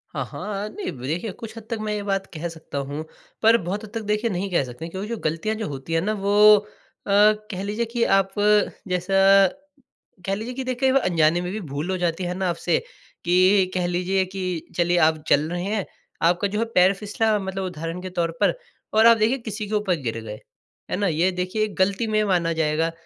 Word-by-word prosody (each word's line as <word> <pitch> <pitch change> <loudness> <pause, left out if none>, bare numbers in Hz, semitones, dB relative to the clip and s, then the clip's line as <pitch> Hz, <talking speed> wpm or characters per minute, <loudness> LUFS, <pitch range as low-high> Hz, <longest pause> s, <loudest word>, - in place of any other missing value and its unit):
हाँ, - - -2
हाँ। 205 -1 -5
अ, - - -4
नहीं 410 -1 -4
देखिए 155 - -4
कुछ 220 +3 -10
हद 225 - -8
तक 230 - -2
मैं 210 - -1
ये 210 -1 -3
बात 195 -1 -1
कह 165 +1 -4
सकता 160 -3 -8
हूँ, 145 +3 -5 0.4
पर 225 +1 +6
बहुत 190 +5 -4
हद 215 - -9
तक 225 - -3
देखिए 210 +2 0
नहीं 195 0 -2
कह 170 - +2
सकते। 130 +6 -8
क्योंकि 190 +4 -5
जो 230 +1 -3
गलतियाँ 165 +8 -1
जो 220 -1 -4
होती 140 +3 -6
हैं 165 - +2
ना 210 +5 0
वो 210 +1 +6 0.5
अ, - - -1 0.4
कह 185 -1 -4
लीजिए 210 +4 -2
कि 230 +1 -1
आप 195 0 +2
अ, 210 0 +4 0.2
जैसा 195 +2 +4 0.8
कह 195 - 0
लीजिए 225 +5 -5
कि 265 +1 -4
देखिए 255 +1 0
कई - - +2
बार 275 - +4
अनजाने 165 0 +3
में 180 0 -4
भी 215 - -4
भूल 145 +5 -3
हो 185 - -1
जाती 175 0 -1
है 180 0 -2
ना 190 -2 0
आपसे 170 0 0 0.5
कि 185 +2 +4
कह 180 -1 0
लीजिए 185 +2 0
कि 190 0 -6 0.3
चलिए 175 0 +2
आप 160 -1 -1
चल 150 +2 +3
रहे 175 0 -2
हैं 200 0 -1 0.4
आपका 180 +4 +2
जो 210 +2 -3
है 230 - +1
पैर 185 +2 +6
फिसला 210 +2 0
मतलब 190 0 -4
उदाहरण 170 -1 -5
के 185 - -6
तौर 170 -1 +1
पर - - +4 0.4
और 220 +1 +5
आप 230 0 +8
देखिए 225 +5 +2
किसी 215 -3 -5
के 215 - -2
ऊपर 205 -4 +1
गिर 115 -3 -3
गए। 105 -1 -7 0.5
है - - 0
ना? 200 0 +1
ये 170 +2 +2
देखिए 185 +4 -1
गलती 195 +4 +1
में 215 -1 +2
माना 180 -5 +1
जाएगा। 160 +1 0
190 Hz, 225 wpm, -23 LUFS, 175-210 Hz, 0.8 s, आप